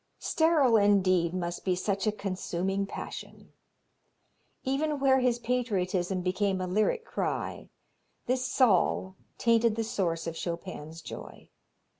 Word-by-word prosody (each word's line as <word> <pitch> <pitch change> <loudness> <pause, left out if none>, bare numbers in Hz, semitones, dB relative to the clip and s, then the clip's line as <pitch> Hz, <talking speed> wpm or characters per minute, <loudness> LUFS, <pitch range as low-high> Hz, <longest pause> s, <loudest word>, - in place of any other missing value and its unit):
Sterile 310 -8 +3
indeed 185 -4 +3
must 175 -1 -3
be 185 -2 +1
such 195 +2 -1
a - - +4
consuming 195 -1 -2
passion. - - -8 1.1
Even 290 +3 0
where 265 -1 +4
his 250 -2 +2
patriotism 195 -7 -1
became 190 +1 0
a 185 - -1
lyric 215 - +1
cry, - - -3 0.6
this 255 0 0
Zal 190 -4 +3 0.2
tainted 230 -1 +3
the 225 - -1
source 175 -7 -1
of 165 -1 -4
Chopin's 165 -2 -6
joy. - - -10
200 Hz, 120 wpm, -29 LUFS, 180-240 Hz, 1.1 s, a